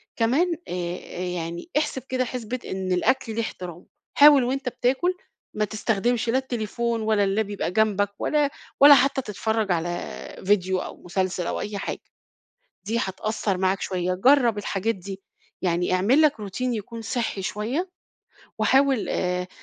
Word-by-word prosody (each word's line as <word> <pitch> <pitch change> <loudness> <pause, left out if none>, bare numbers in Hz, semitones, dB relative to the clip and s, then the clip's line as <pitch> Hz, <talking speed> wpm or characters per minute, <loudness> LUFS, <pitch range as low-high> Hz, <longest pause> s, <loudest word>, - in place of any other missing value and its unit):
كمان 275 +10 +2
آآ - - -5
آآ 175 0 -5
يعني 175 - -4
احسب 295 -3 0
كده 255 0 0
حسبة 250 0 -4
إن 190 -1 -3
الأكل 225 +5 +1
ليه 230 - 0
احترامُه، 180 -6 -7 0.3
حاول 285 -2 +8
وأنت 260 +1 -1
بتاكل 265 +10 +1 0.4
ما 210 - +1
تستخدمش 225 +2 0
لا 245 - +3
التليفون 235 -2 -2
ولا 215 -1 +2
اللاب 200 +3 +1
بيبقى 200 -4 -3
جنبَك، 205 -1 +2
ولا 295 -2 +2 0.3
ولا 285 +1 +10
حتى 275 +1 +2
تتفرج 220 -2 -1
على 175 0 0 0.6
فيديو 190 -2 +2
أو - - -7
مسلسل 185 0 -1
أو - - -2
أي 210 -1 -4
حاجة، - - -4 0.8
دي 225 +3 -1
هتأثّر 200 0 -2
معاك 190 +1 +1
شوية، 180 -1 -1
جرب 240 +2 +4
الحاجات 205 +2 -1
دي، 195 +1 -8 0.4
يعني 175 -1 +1
اعمل 225 +12 +4
لَك 305 -2 +5
Routine 200 +3 -6
يكون 230 -2 -3
صحّي 225 -3 -2
شوية، 240 - -2 0.7
وحاول 270 -3 +3
آآ 180 0 -1
215 Hz, 150 wpm, -24 LUFS, 190-255 Hz, 0.8 s, ولا